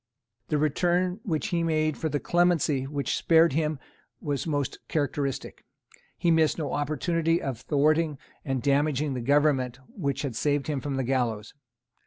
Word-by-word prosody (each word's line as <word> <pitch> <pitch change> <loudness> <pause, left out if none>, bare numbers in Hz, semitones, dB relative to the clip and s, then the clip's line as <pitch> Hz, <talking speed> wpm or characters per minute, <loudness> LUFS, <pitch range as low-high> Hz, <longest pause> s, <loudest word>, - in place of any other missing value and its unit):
The 150 - 0
return 175 +5 +1
which 160 -9 -2
he 170 -1 0
made 155 -2 +1
for 160 - -2
the 145 - -1
clemency 165 -6 +2
which 140 0 -2
spared 165 -2 +4
him 155 0 0 0.4
was 145 0 -3
most 145 -4 -2
characteristic. 145 -2 -2 0.5
He 170 - +2
missed 160 -1 +3
no 150 -5 -3
opportunity 165 +3 0
of 130 -4 -4
thwarting 155 +1 +2 0.3
and 135 -3 -2
damaging 145 0 +1
the 125 - -3
Government 135 -2 +2
which 150 - -3
had 135 -5 -3
saved 145 +2 0
him 145 -3 -2
from 140 0 -3
the 135 - 0
gallows. 120 -5 -1
150 Hz, 155 wpm, -27 LUFS, 135-160 Hz, 0.5 s, spared